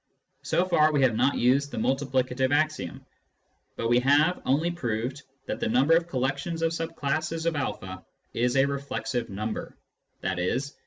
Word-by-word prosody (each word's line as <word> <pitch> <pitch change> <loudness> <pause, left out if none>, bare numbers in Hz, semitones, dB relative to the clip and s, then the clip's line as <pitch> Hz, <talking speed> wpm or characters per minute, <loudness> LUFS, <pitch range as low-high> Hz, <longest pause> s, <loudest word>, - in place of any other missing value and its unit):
So 180 - +1
far 155 -4 +4
we 145 -3 +2
have 120 -4 +3
not 135 +5 +2
used 135 +4 +3
the - - -7
multiplica 130 +1 0
tive 130 +1 +1
axiom, 155 - -1 0.7
but 115 - -2
we 120 +1 +4
have 145 +7 +3
only 155 +6 +2
proved 125 -3 -3 0.2
that - - -4
the - - -1
number 135 +8 +4
of 165 0 +1
collec 135 +1 -1
tions 165 +2 -4
of 165 0 +1
sub 165 0 -4
classes 155 +3 -2
of 170 - +2
a 95 -9 -4 0.3
is 120 +2 +1
a 135 - +5
reflexive 140 -3 -3
number, 105 +3 -5 0.5
i.e. 90 +6 0
140 Hz, 170 wpm, -27 LUFS, 125-155 Hz, 0.7 s, a